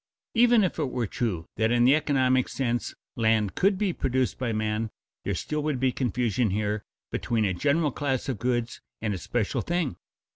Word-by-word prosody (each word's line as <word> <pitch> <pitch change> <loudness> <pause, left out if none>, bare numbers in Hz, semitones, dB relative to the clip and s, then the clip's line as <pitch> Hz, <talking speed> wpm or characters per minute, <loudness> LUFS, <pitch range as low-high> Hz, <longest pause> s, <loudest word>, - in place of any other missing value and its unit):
Even 235 -2 +5
if 180 - -1
it 145 -4 0
were 125 -2 -1
true 95 -7 -2
that 110 +1 +2
in 120 0 +3
the 130 - +7
economic 130 -4 +2
sense 120 -3 -2 0.2
land 110 -3 +2
could 195 +1 +2
be 195 -3 0
produced 130 -3 0
by 125 -3 -1
man, 110 0 -1 0.3
there - - -1
still 150 0 -2
would 150 -3 -1
be 130 0 +2
confusion 120 -2 0
here 105 +1 -1 0.3
between 115 -3 0
a 95 - +1
general 145 - +1
class 135 -1 -1
of 130 -7 -2
goods 120 -1 -1 0.2
and 110 -2 -1
a 95 - -4
special 110 +4 -1
thing. 170 - -1
125 Hz, 185 wpm, -27 LUFS, 110-140 Hz, 0.3 s, the